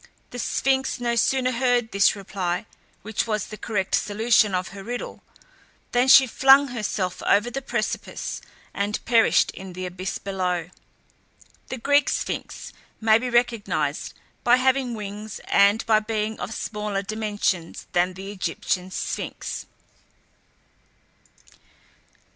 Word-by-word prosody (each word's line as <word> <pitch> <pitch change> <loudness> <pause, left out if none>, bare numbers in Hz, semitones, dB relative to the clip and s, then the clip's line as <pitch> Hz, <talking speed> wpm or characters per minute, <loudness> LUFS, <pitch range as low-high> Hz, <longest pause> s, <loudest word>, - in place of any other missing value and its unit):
The 245 - -6
Sphinx 265 +1 0
no 240 -1 0
sooner 255 +2 +2
heard 245 -2 +1
this 200 +1 +4
reply, 190 -3 -3 0.4
which 220 +3 -2
was 215 -2 -1
the 215 - -8
correct 205 -3 -3
solution 215 -1 +3
of 180 0 -2
her 195 0 -9
riddle, 240 +3 -6 0.7
than 245 +1 +3
she 265 0 +9
flung 270 +3 +5
herself 205 -6 -3
over 210 +4 +2
the 270 - -3
precipice, 235 -4 -3 0.3
and 205 +1 -1
perished 230 -1 +4
in 190 -1 -9
the 185 +1 -5
abyss 185 +1 -4
below. 180 -3 -2 1.0
The 260 - -4
Greek 285 +4 +3
Sphinx - - -4 0.3
may 220 0 +4
be 250 +1 -3
recognized 200 -11 0 0.3
by 245 0 +6
having 255 -1 +1
wings 210 0 -7
and 200 +2 +4
by 215 -1 +4
being 215 0 -3
of - - -5
smaller 210 -3 -3
dimensions 205 -5 -2
than 180 +1 +1
the 195 +2 -7
Egyptian 185 -1 -2
Sphinx. - - -5
215 Hz, 125 wpm, -24 LUFS, 195-240 Hz, 1.0 s, she